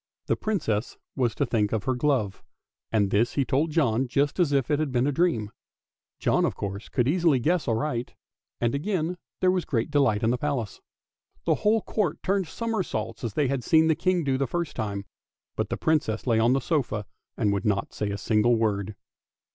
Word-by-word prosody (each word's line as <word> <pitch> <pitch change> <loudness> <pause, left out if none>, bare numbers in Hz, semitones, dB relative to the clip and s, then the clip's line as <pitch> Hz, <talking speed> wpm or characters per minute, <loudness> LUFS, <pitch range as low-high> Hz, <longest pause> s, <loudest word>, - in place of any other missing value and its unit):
The - - +1
Princess 125 - -2 0.2
was 120 -5 0
to - - +1
think 105 -3 0
of 110 -3 -1
her 130 - +1
glove, 125 -7 0 0.5
and 100 -3 +2
this 115 +4 +2
he 140 - +1
told 145 +5 +1
John 135 -6 +1
just 140 +6 0
as 170 -5 +3
if 140 -1 +1
it 145 - +2
had 155 -3 -1
been 125 0 +2
a 145 - +2
dream. 130 -10 +1 0.7
John - - +2
of - - 0
course 100 +1 -5
could 125 -2 +1
easily 165 -2 +3
guess 160 +5 +1
aright, 120 +1 -1 0.4
and 120 -1 +1
again 175 +2 -1 0.2
there 185 - +4
was 185 -2 0
great 120 -3 -1
delight 130 -7 +2
at 115 - +3
the 125 - -1
Palace. 135 -8 -2 0.6
The - - +4
whole 215 +1 +3
court 195 -9 -1
turned 195 -2 +1
somersaults, 175 - -3
as 115 -4 -3
they 145 -3 +2
had 135 -1 -1
seen 160 +3 +4
the - - +5
King 180 +1 +1
do 135 -2 0
the 135 - +1
first 170 +2 -3
time; 100 -2 -3 0.5
but - - -2
the - - -2
Princess 145 -9 0
lay 115 -3 +3
on 115 +3 +4
the 135 - +1
sofa 130 -10 -1 0.3
and 105 -1 +2
would 100 - -1
not 105 -3 0
say 105 - -2
a 100 - -3
single 110 +3 +3
word. 105 -2 -1
130 Hz, 205 wpm, -26 LUFS, 110-160 Hz, 0.7 s, the